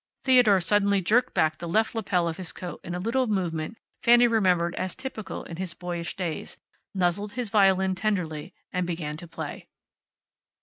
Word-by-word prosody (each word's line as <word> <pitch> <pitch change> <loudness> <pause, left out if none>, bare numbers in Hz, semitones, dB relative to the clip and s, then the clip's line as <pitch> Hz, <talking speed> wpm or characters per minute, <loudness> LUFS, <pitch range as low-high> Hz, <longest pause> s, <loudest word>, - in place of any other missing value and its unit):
Theodore 245 -7 +6
suddenly 200 +2 +3
jerked 220 +7 +2
back 155 0 +2
the 170 - -5
left 220 +5 +2
lapel 185 -6 0
of 165 - -3
his 185 -3 -3
coat 180 -1 -7
in 175 - -5
a - - -3
little 240 +6 0
movement 180 -1 -2 0.2
Fanny 240 0 +6
remembered 185 -7 +2
as 185 -1 -3
typical 245 -6 -6
in 165 - -8
his 180 -2 -4
boyish 175 -1 -4
days, 170 -5 -4 0.4
nuzzled 190 +3 0
his 245 -3 -3
violin 190 -2 +4
tenderly, 180 -6 -2 0.2
and 180 -1 -1
began 165 -4 -3
to 175 +1 -9
play. 165 - -7
185 Hz, 170 wpm, -26 LUFS, 170-215 Hz, 0.4 s, Theodore